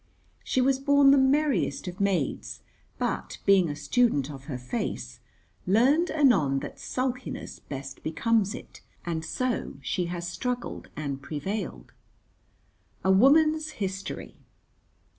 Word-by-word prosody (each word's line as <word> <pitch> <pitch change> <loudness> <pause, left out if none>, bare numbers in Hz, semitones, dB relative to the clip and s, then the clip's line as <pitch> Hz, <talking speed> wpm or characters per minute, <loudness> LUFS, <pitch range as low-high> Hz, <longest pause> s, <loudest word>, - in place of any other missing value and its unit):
She 260 - +1
was 265 +1 +2
born 280 0 +5
the 280 - +6
merriest 265 - +2
of 180 0 -6
maids, 190 -8 -1 0.3
but, 65 0 -2
being 190 -4 +5
a 145 - -3
student 150 - +1
of 135 -1 -10
her 140 -4 -4
face, 125 - -4 0.5
learned 270 - +4
anon 215 - +3
that - - -8
sulkiness 255 0 -4
best 135 -1 -8
becomes 210 +5 +1
it, - - -11 0.2
and 165 -2 -2
so 245 +9 -2
she 175 +8 -1
has 175 0 -4
struggled 245 +7 -4
and 140 -3 -4
prevailed. 160 +9 -5 1.1
A 190 - +4
woman's 310 +8 +4
history. 195 -1 -5
195 Hz, 125 wpm, -27 LUFS, -, 1.1 s, the